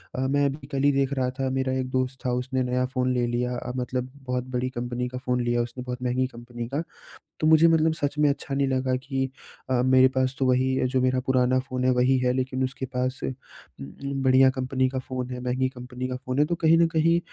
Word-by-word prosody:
अ, -, -, -3 dB
मैं 140 Hz, +1 st, +2 dB
अभी 140 Hz, 0 st, -3 dB
कल 135 Hz, 0 st, -1 dB
ही 145 Hz, -, +5 dB
देख 135 Hz, 0 st, +1 dB
रहा 130 Hz, -2 st, 0 dB
था, 135 Hz, -, 0 dB
मेरा 130 Hz, 0 st, -1 dB
एक 130 Hz, 0 st, -3 dB
दोस्त 130 Hz, +1 st, -1 dB
था, 125 Hz, -, +1 dB
उसने 130 Hz, +1 st, -1 dB
नया 125 Hz, 0 st, 0 dB
फ़ोन 130 Hz, 0 st, +1 dB
ले 125 Hz, -1 st, +1 dB
लिया 125 Hz, +1 st, -1 dB
अ, 125 Hz, -, -5 dB
मतलब 125 Hz, 0 st, -2 dB, 0.2 s
बहुत 125 Hz, 0 st, -1 dB
बड़ी 125 Hz, +1 st, 0 dB
कंपनी 120 Hz, 0 st, -3 dB
का 125 Hz, -, -6 dB
फ़ोन 125 Hz, 0 st, +1 dB
लिया 120 Hz, 0 st, +1 dB
उसने, 120 Hz, +1 st, -5 dB
बहुत 125 Hz, 0 st, -5 dB
महँगी 125 Hz, +1 st, +1 dB
कंपनी 120 Hz, -1 st, -8 dB
का। 145 Hz, -, +1 dB, 0.6 s
तो 155 Hz, -, +2 dB
मुझे 160 Hz, +1 st, +7 dB
मतलब 160 Hz, -1 st, +3 dB
सच 145 Hz, -1 st, -2 dB
में 150 Hz, -, +5 dB
अच्छा 140 Hz, 0 st, -3 dB
नहीं 140 Hz, 0 st, +1 dB
लगा 130 Hz, -1 st, 0 dB
कि 135 Hz, +1 st, -2 dB, 0.4 s
अ 125 Hz, -1 st, +2 dB
मेरे 130 Hz, 0 st, +6 dB
पास 130 Hz, 0 st, 0 dB
तो 135 Hz, -, +2 dB
वही 130 Hz, +1 st, +2 dB
जो 130 Hz, 0 st, 0 dB
मेरा 130 Hz, 0 st, +2 dB
पुराना 130 Hz, 0 st, +3 dB
फ़ोन 130 Hz, 0 st, -4 dB
है, -, -, +4 dB
वही 125 Hz, +1 st, +3 dB
है, 125 Hz, 0 st, +2 dB
लेकिन 130 Hz, 0 st, -1 dB
उसके 130 Hz, 0 st, -3 dB
पास 130 Hz, +1 st, -1 dB
उम -, -, -1 dB, 0.5 s
उम, 135 Hz, -, -5 dB
बढ़िया 130 Hz, 0 st, +6 dB
कंपनी 130 Hz, 0 st, 0 dB
का 130 Hz, 0 st, -3 dB
फ़ोन 130 Hz, -1 st, -5 dB
है, 125 Hz, -, -4 dB
महँगी 130 Hz, +1 st, 0 dB
कंपनी 125 Hz, 0 st, -6 dB
का 130 Hz, -, -3 dB
फ़ोन 130 Hz, +1 st, -3 dB
है। 150 Hz, -, +5 dB
तो 170 Hz, -, -1 dB
कहीं 165 Hz, 0 st, +5 dB
न 170 Hz, -, +5 dB
कहीं 165 Hz, +1 st, +2 dB
130 Hz, 240 wpm, -25 LUFS, 125-135 Hz, 0.6 s, मुझे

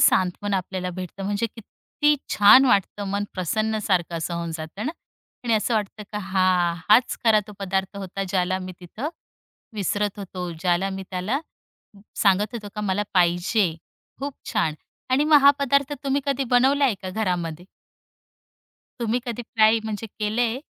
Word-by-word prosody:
सांत्वन 190 Hz, +2 st, +2 dB
आपल्याला 185 Hz, 0 st, -2 dB
भेटतं, 185 Hz, +2 st, -7 dB
म्हणजे 205 Hz, +3 st, 0 dB
किती 295 Hz, +7 st, -1 dB, 0.2 s
छान 210 Hz, +6 st, +8 dB
वाटतं 205 Hz, -1 st, +1 dB
मन 200 Hz, +1 st, -1 dB
प्रसन्न 215 Hz, +4 st, -1 dB
सारखं 175 Hz, -3 st, +1 dB
असं 170 Hz, +1 st, -3 dB
होऊन 170 Hz, 0 st, -3 dB
जातं 160 Hz, -, -6 dB
ना 315 Hz, -, -2 dB, 0.5 s
आणि 230 Hz, -2 st, +2 dB
असं 220 Hz, +2 st, +1 dB
वाटतं 210 Hz, 0 st, -2 dB
का 210 Hz, -, -2 dB
हां, 185 Hz, -3 st, +2 dB
हाच 235 Hz, +4 st, +5 dB
खरा 215 Hz, -2 st, +5 dB
तो 210 Hz, -, -10 dB
पदार्थ 190 Hz, 0 st, -2 dB
होता, 195 Hz, 0 st, -4 dB
ज्याला 185 Hz, 0 st, 0 dB
मी 185 Hz, 0 st, -7 dB
तिथं 220 Hz, -, -5 dB, 0.7 s
विसरत 205 Hz, +1 st, -1 dB
होतो, 180 Hz, -2 st, -5 dB
ज्याला 175 Hz, +3 st, 0 dB
मी 190 Hz, 0 st, -5 dB
त्याला 195 Hz, +10 st, -1 dB, 0.8 s
सांगत 205 Hz, +3 st, +2 dB
होतो 210 Hz, -3 st, -6 dB
का 210 Hz, -, -4 dB
मला 205 Hz, 0 st, 0 dB
पाहिजे. 175 Hz, +1 st, +2 dB, 0.5 s
खूप 280 Hz, 0 st, -4 dB, 0.2 s
छान 165 Hz, -9 st, +1 dB, 0.4 s
आणि 275 Hz, +3 st, +3 dB
मग 305 Hz, -1 st, +6 dB
हा 280 Hz, -, +9 dB
पदार्थ 280 Hz, +1 st, +1 dB
तुम्ही 275 Hz, +1 st, +1 dB
कधी 275 Hz, -1 st, 0 dB
बनवलाय 265 Hz, 0 st, +4 dB
का 185 Hz, -, -4 dB
घरामध्ये? 180 Hz, -5 st, -2 dB, 1.4 s
तुम्ही 235 Hz, +1 st, 0 dB
कधी 240 Hz, 0 st, -4 dB
ट्राय 220 Hz, 0 st, +3 dB
म्हणजे 220 Hz, +1 st, -4 dB
केलंय? 225 Hz, +4 st, 0 dB
205 Hz, 155 wpm, -24 LUFS, 185-230 Hz, 1.4 s, हा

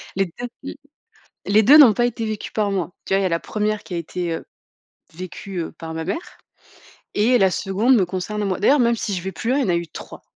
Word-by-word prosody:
Les 195 Hz, -, +2 dB
2 245 Hz, +9 st, -8 dB, 0.2 s
mmh, -, -, -5 dB, 0.8 s
les 210 Hz, +2 st, +4 dB
2 280 Hz, +8 st, +8 dB
n'ont 275 Hz, -7 st, +9 dB
pas 240 Hz, +3 st, +1 dB
été 230 Hz, -1 st, -3 dB
vécues 215 Hz, -1 st, -4 dB
par 210 Hz, -2 st, 0 dB
moi. 185 Hz, -2 st, -2 dB
Tu -, -, -5 dB
vois, 195 Hz, -, +4 dB
il -, -, 0 dB
y -, -, +1 dB
a -, -, +2 dB
la 165 Hz, -1 st, 0 dB
1re 215 Hz, 0 st, -2 dB
qui -, -, -12 dB
a -, -, -1 dB
été, 170 Hz, +1 st, -4 dB
heu, 165 Hz, -, -5 dB, 0.7 s
vécue, 185 Hz, +2 st, -7 dB
heu, 165 Hz, -, -4 dB
par 160 Hz, 0 st, -7 dB
ma 160 Hz, -, -4 dB
mère 335 Hz, -, -5 dB, 0.8 s
et 240 Hz, +4 st, +3 dB
la 190 Hz, -2 st, +4 dB
2de 210 Hz, +7 st, +2 dB
me 195 Hz, -, +3 dB
concerne 190 Hz, +4 st, -4 dB
moi. 190 Hz, -2 st, -1 dB
D'ailleurs, 270 Hz, +7 st, +4 dB
même 235 Hz, 0 st, +3 dB
si 205 Hz, -3 st, -3 dB
je 180 Hz, -, -4 dB
vais 190 Hz, -, -4 dB
plus 230 Hz, +7 st, -3 dB
loin, 270 Hz, -, +2 dB
il -, -, +2 dB
y 250 Hz, -, 0 dB
en -, -, -3 dB
a 175 Hz, -, +2 dB
eu 170 Hz, 0 st, -3 dB
3, -, -, -11 dB
200 Hz, 265 wpm, -21 LUFS, 180-225 Hz, 0.8 s, n'ont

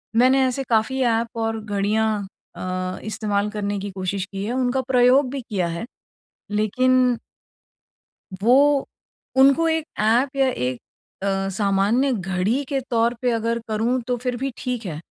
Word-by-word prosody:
मैंने 260 Hz, +3 st, +5 dB
ऐसे 255 Hz, +2 st, -2 dB
काफ़ी 235 Hz, +4 st, +1 dB
ऐप 230 Hz, -2 st, +2 dB
और 225 Hz, 0 st, -1 dB
घड़ियाँ 210 Hz, 0 st, 0 dB, 0.3 s
अ, 185 Hz, 0 st, -4 dB
इस्तेमाल 210 Hz, -1 st, -1 dB
करने 205 Hz, -1 st, -3 dB
की 200 Hz, +1 st, -5 dB
कोशिश 190 Hz, 0 st, -3 dB
की 195 Hz, 0 st, -6 dB
है, 220 Hz, -, -2 dB
उनका 255 Hz, 0 st, +1 dB
प्रयोग 255 Hz, +1 st, +4 dB
भी 275 Hz, -, -4 dB
किया 200 Hz, -7 st, -2 dB
है 170 Hz, +5 st, -4 dB, 0.7 s
लेकिन 250 Hz, +4 st, +2 dB, 1.2 s
वो 275 Hz, +4 st, +4 dB, 0.5 s
उनको 275 Hz, +5 st, +5 dB
एक 320 Hz, -1 st, 0 dB, 0.2 s
ऐप 245 Hz, +6 st, +2 dB
या 270 Hz, -1 st, +3 dB
एक 125 Hz, -, -3 dB, 0.4 s
अ, 195 Hz, 0 st, 0 dB
सामान्य 205 Hz, +7 st, +2 dB
घड़ी 190 Hz, +6 st, -1 dB
के 270 Hz, 0 st, -2 dB
तौर 235 Hz, 0 st, +2 dB
पे 250 Hz, -, +2 dB
अगर 230 Hz, +1 st, 0 dB
करूँ 230 Hz, +4 st, 0 dB
तो 250 Hz, -, 0 dB
फिर 245 Hz, 0 st, -3 dB
भी 270 Hz, +2 st, -2 dB
ठीक 250 Hz, -2 st, -4 dB
है 160 Hz, -, -4 dB
230 Hz, 150 wpm, -22 LUFS, 200-255 Hz, 1.2 s, मैंने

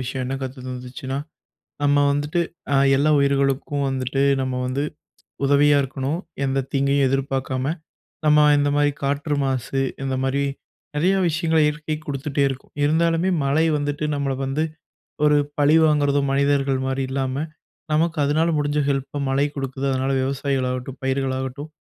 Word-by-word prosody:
விஷயம் 130 Hz, 0 st, -3 dB
என்ன 130 Hz, -, -2 dB
கத்து 130 Hz, 0 st, -6 dB
தந்துச்சுன்னா, 125 Hz, +1 st, -5 dB, 0.6 s
நம்ம 145 Hz, 0 st, +3 dB, 0.2 s
வந்துட்டு 145 Hz, +4 st, 0 dB, 0.3 s
அ -, -, +5 dB, 0.2 s
எல்லா 155 Hz, +2 st, +3 dB
உயிர்களுக்கும் 140 Hz, +1 st, +1 dB
வந்துட்டு, 135 Hz, +1 st, -1 dB, 0.2 s
நம்ம 130 Hz, -1 st, -2 dB
வந்து 135 Hz, +3 st, -1 dB, 0.6 s
உதவியா 145 Hz, +1 st, +5 dB
இருக்கணும். 135 Hz, +4 st, -3 dB, 0.3 s
எந்த 135 Hz, -1 st, 0 dB
தீங்கயும் 140 Hz, 0 st, +2 dB
எதிர்பார்க்காம 135 Hz, +1 st, -1 dB, 0.5 s
நம்ம 150 Hz, 0 st, +6 dB, 0.2 s
இந்த 145 Hz, -, +2 dB
மாரி 145 Hz, 0 st, +3 dB
காற்று 145 Hz, +2 st, -1 dB
மாசு, 135 Hz, 0 st, -1 dB, 0.2 s
இந்த 135 Hz, -1 st, -1 dB
மாரி 135 Hz, +1 st, 0 dB, 0.5 s
நிறைய 180 Hz, +6 st, +3 dB
விஷயங்கள 160 Hz, 0 st, +1 dB
இயற்கைக் 150 Hz, +1 st, -3 dB
குடுத்துட்டே 140 Hz, 0 st, -2 dB
இருக்கும். 135 Hz, -1 st, -8 dB
இருந்தாலுமே 165 Hz, +4 st, +2 dB
மழை 145 Hz, +4 st, +2 dB
வந்துட்டு 145 Hz, +1 st, -2 dB
நம்மள 140 Hz, -1 st, -1 dB
வந்து, 135 Hz, +3 st, -1 dB, 0.6 s
ஒரு 150 Hz, 0 st, +5 dB, 0.2 s
பழிவாங்குறதோ 145 Hz, -1 st, +4 dB
மனிதர்கள் 140 Hz, -1 st, +2 dB
மாரி 135 Hz, 0 st, -1 dB
இல்லாம, 130 Hz, -1 st, -2 dB, 0.6 s
நமக்கு 165 Hz, +2 st, +1 dB
அதனால 155 Hz, +4 st, +2 dB
முடிஞ்ச 145 Hz, 0 st, 0 dB
ஹெல்ப்ப 140 Hz, +1 st, -2 dB
மழை 140 Hz, +2 st, +2 dB
குடுக்குது. 135 Hz, 0 st, -3 dB
அதனால 130 Hz, +1 st, 0 dB
விவசாயிகள் 135 Hz, -1 st, -1 dB
ஆகட்டும், 130 Hz, +1 st, -5 dB
பயிர்களாகட்டும், 130 Hz, +2 st, -2 dB
140 Hz, 135 wpm, -22 LUFS, 135-145 Hz, 0.6 s, நம்ம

